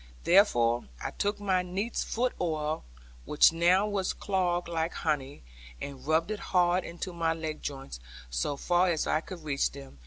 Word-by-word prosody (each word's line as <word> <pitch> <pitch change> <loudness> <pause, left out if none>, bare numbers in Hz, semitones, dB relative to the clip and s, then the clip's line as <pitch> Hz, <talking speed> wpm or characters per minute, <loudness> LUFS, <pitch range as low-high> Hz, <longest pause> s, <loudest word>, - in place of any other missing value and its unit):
Therefore 120 - +4
I - - -4
took 205 +1 -1
my 190 -3 +1
neatsfoot 220 +6 -1
oil, 155 -2 -1 0.4
which 150 +2 +5
now 175 +4 +4
was 200 -3 -1
clogged 180 -3 0
like 165 0 -1
honey, 145 - -2 0.4
and 140 - -8
rubbed 160 +5 +2
it 215 - -3
hard 180 0 +2
into 175 +2 -6
my 165 -1 +1
leg 160 -1 -5
joints, 135 - -6 0.3
so 60 - -2
far 175 +4 +2
as 160 -3 0
I 155 - +1
could 170 -1 -9
reach 140 -2 +1
them. 135 - -11
170 Hz, 160 wpm, -29 LUFS, 150-185 Hz, 0.4 s, which